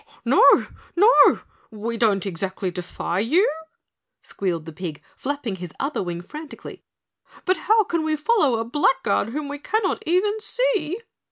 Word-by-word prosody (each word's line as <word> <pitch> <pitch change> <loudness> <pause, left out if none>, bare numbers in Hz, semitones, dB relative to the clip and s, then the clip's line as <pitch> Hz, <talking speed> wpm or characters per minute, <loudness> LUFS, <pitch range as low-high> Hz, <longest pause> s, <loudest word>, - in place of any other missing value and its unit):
"No! - - +4 0.5
No! 420 +7 +6 0.3
We 225 +1 -4
don't 210 -4 +2
exactly 190 0 -3
defy 175 0 -3
you," 315 - +3 0.8
squealed 175 -5 -3
the 165 - -9
pig, 160 -3 -6 0.2
flapping 265 -8 -4
his 175 -3 -8
other 280 +2 -1
wing 175 -2 -4
frantically, 300 - -10 0.6
"but 370 +1 +2
how 440 0 +6
can 335 -4 -1
we 315 0 0
follow 300 - +2
a 225 - -2
blackguard 265 -3 +1
whom 290 +4 -4
we 285 0 -6
cannot 400 +5 -1
even 410 +5 +2
see?" 430 -6 -1
275 Hz, 145 wpm, -23 LUFS, -, 0.8 s, No